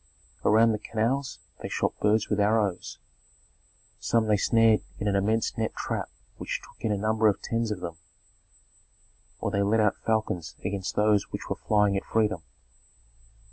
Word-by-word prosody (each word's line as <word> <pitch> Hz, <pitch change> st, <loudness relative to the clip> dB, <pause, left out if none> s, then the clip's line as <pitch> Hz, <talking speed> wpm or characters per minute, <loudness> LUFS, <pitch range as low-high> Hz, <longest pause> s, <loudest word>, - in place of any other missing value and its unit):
Around 115 Hz, +2 st, +5 dB
the 105 Hz, -, -1 dB
canals 120 Hz, +6 st, -1 dB, 0.2 s
they -, -, -6 dB
shot -, -, 0 dB
birds 105 Hz, +1 st, +2 dB
with 105 Hz, -, 0 dB
arrows; 100 Hz, -3 st, +1 dB, 1.0 s
some 115 Hz, -1 st, +1 dB
they 105 Hz, -1 st, +3 dB
snared 115 Hz, +1 st, +4 dB, 0.2 s
in 105 Hz, -, -3 dB
an 100 Hz, -, +2 dB
immense 110 Hz, +3 st, +1 dB
net 110 Hz, -, -1 dB
trap -, -, -3 dB, 0.3 s
which -, -, -3 dB
took -, -, -18 dB
in 110 Hz, -, +1 dB
a 105 Hz, -, +1 dB
number 110 Hz, +2 st, +2 dB
of 100 Hz, -, +2 dB
tens 115 Hz, -1 st, -2 dB
of 105 Hz, -4 st, -4 dB
them, 85 Hz, -2 st, -6 dB, 1.4 s
or 100 Hz, -, -1 dB
they 100 Hz, -1 st, +1 dB
let 105 Hz, +3 st, +2 dB
out 105 Hz, -2 st, +3 dB
falcons 110 Hz, -7 st, -2 dB
against 95 Hz, -1 st, -3 dB
those 105 Hz, -1 st, +2 dB
which -, -, -6 dB
were -, -, +1 dB
flying 105 Hz, -2 st, +2 dB
at 100 Hz, -, -1 dB
freedom. 105 Hz, -6 st, +1 dB
105 Hz, 165 wpm, -27 LUFS, 100-110 Hz, 1.4 s, Around